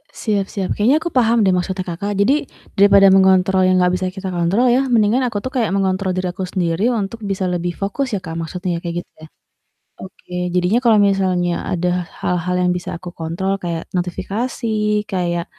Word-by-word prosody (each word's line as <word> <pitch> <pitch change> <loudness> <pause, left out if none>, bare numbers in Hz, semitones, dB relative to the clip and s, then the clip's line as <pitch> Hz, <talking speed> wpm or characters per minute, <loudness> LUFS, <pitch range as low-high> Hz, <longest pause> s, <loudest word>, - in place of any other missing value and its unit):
E - - -34
siap 205 -3 0
siap. 195 -3 -2
Kayaknya 240 +8 +3
aku 340 - -3
paham 235 -2 +3
deh 190 - +3
maksudnya 185 +1 -2
Kakak. 190 +4 -3
Jadi, 275 +9 +2 0.3
daripada 200 0 +6
mengontrol 190 0 +4
yang 185 - +3
enggak 180 0 +3
bisa 185 0 -2
kita 190 0 -6
kontrol 180 +8 +2
ya 250 +3 +3
mendingan 225 +2 +3
aku 220 -3 -3
tuh 260 - -4
kayak 235 -4 +1
mengontrol 190 -1 0
diri 185 0 -1
aku 190 - -5
sendiri 180 +6 0
untuk 225 0 -3
bisa 195 -1 -2
lebih 175 0 -2
fokus 225 +7 -2
ya, - - -4
Kak, 165 -1 -6
maksudnya 175 +2 -3
kayak 175 0 -3
gitu - - -47
ya? - - -10 0.8
Oke. 185 -1 -12 0.2
Jadinya 180 +6 +2
kalau 230 -3 +5
misalnya 185 -3 +1
ada 180 0 0 0.3
hal-hal 180 0 -1
yang - - +2
bisa 175 - -7
aku 180 0 -8
kontrol 175 +4 -2
kayak 170 -2 -4
notifikasi, 210 +7 -3 0.4
kayak, 175 -3 -1
190 Hz, 190 wpm, -19 LUFS, 180-205 Hz, 0.8 s, daripada